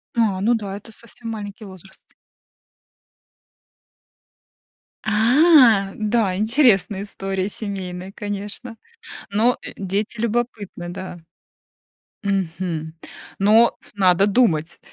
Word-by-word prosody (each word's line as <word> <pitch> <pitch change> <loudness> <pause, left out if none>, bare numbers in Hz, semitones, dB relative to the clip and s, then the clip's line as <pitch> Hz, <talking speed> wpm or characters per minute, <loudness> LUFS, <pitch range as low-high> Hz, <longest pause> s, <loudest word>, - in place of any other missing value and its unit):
А, 215 -5 +1
ну 225 +4 +3
да, 200 -3 -4
это 210 +2 -14
совсем 235 0 -10
маленький 210 -1 -7
возраст. 190 -1 -14 3.0
А! 225 - +5
Да, 215 -3 0
интересная 210 -3 +2
история, 195 -1 -3
семейная, 190 -3 -6
конечно, 205 +4 -5 0.5
но, 225 +5 +2
э, - - -8
дети 200 +4 -3
любопытны, 225 -6 -3
да. 185 0 -7 1.1
Мгм. 170 -4 -2 0.5
Но 220 +4 +5 0.2
надо 190 0 +4
думать. 190 -8 +1
205 Hz, 90 wpm, -21 LUFS, 190-225 Hz, 3.0 s, А